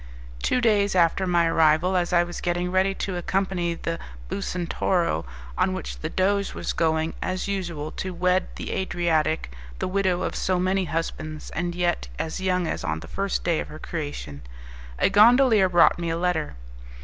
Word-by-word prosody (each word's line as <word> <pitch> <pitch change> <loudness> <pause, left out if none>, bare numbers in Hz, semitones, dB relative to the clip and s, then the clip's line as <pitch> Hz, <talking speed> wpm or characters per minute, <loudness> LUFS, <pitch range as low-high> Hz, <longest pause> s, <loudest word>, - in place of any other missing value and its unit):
Two 250 - +1
days 205 -4 +3
after 180 +2 +3
my 175 -1 +3
arrival, 165 +2 +3
as 175 0 +1
I 175 -1 +4
was 175 0 -6
getting 175 +1 -1
ready 190 +1 +2
to 190 -2 -3
accompany 180 -1 -1
the 165 0 -4 0.3
Bucentoro, 170 - -1 0.3
on - - +2
which - - -5
the - - -3
Doge 200 +1 0
was - - -3
going, 160 0 +1
as 185 +1 -2
usual, 170 -6 -3
to 190 - -3
wed 180 +1 +1
the - - -5
Adriatic, 160 - 0 0.3
the - - -2
widow 185 -1 0
of - - -3
so 185 -1 0
many 185 +1 +1
husbands, 160 -2 -4
and 175 0 -3
yet 175 - 0
as 160 +3 -3
young 185 -1 +1
as - - -3
on 80 0 -2
the - - -10
first 195 0 -2
day 170 -2 +1
of - - -4
her 155 - -9
creation, 145 - -6 0.6
a - - +3
gondolier 220 -1 +6
brought 175 -1 +5
me 170 -1 -2
a 165 - -1
letter. 170 - -1
175 Hz, 175 wpm, -25 LUFS, 165-190 Hz, 0.6 s, gondolier